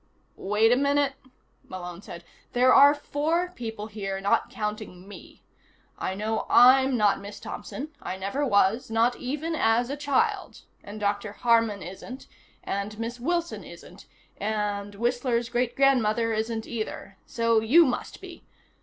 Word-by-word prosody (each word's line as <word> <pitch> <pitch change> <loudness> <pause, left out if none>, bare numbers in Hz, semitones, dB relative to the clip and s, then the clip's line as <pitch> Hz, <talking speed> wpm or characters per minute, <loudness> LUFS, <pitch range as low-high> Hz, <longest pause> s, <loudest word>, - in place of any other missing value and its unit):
"Wait 210 +3 +2
a - - +6
minute?" 280 +1 +1 0.6
Malone 180 -1 -7
said. 170 -4 -10 0.3
"There 255 +1 +5
are 285 +1 +7
four 320 +5 -1
people 225 -9 -6
here, 200 -3 -5
not 195 +1 +1
counting 210 -4 -6
me. 205 - -13 0.5
I 190 - -4
know 215 +2 -2
I'm 260 +1 +6
not 210 -2 +3
Miss 200 +1 -9
Thompson. 275 +8 -7
I 185 - -5
never 200 +10 -2
was, 210 -2 +2
not 230 +2 +2
even 295 +6 -3
as 240 -3 +1
a - - -2
child. 385 +9 -1 0.2
And 205 +1 -9
Dr. 205 0 -2
Harman 230 -4 +2
isn't, 195 - -9 0.4
and 200 +2 -4
Miss 230 +2 -5
Wilson 340 +6 -2
isn't, - - -13 0.3
and 205 -1 -3
Whistler's 240 +1 -1
Great 240 0 -1
Grandmother 235 -4 +2
isn't, 220 +1 -2
either. 215 -4 -6
So 230 -1 +2
you 280 +10 +5
must 255 - -4
be. - - -11
230 Hz, 145 wpm, -26 LUFS, 205-265 Hz, 0.6 s, are